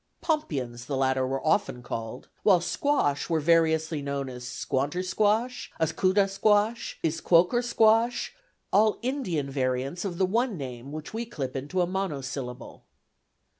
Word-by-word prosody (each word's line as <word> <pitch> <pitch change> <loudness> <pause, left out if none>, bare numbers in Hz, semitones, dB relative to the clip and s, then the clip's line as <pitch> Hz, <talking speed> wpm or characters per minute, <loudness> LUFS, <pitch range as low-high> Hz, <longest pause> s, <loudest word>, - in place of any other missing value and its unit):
"Pompions," 130 - -2
the 140 - -2
latter 130 -1 +1
were 135 +2 -3
often 155 -6 +1
called, 115 0 -6
while 190 -4 +5
"squash" 175 - 0
were 165 -1 +2
variously 160 -1 +2
known 140 -1 -3
as 125 -1 -8
squantersquash, 185 - -1
askutasquash, 200 +6 +2
isquoukersquash, 220 +8 +3 0.4
all 215 +1 +4
Indian 185 - -2
variants 135 +4 -1
of 185 -4 -4
the 190 - +3
one 225 +2 0
name 130 -1 -7
which 155 +4 -7
we 225 +1 -2
clip 135 - -5
into 145 +8 -1
a - - +3
monosyllable. 140 -9 -5
165 Hz, 125 wpm, -27 LUFS, 135-205 Hz, 0.4 s, while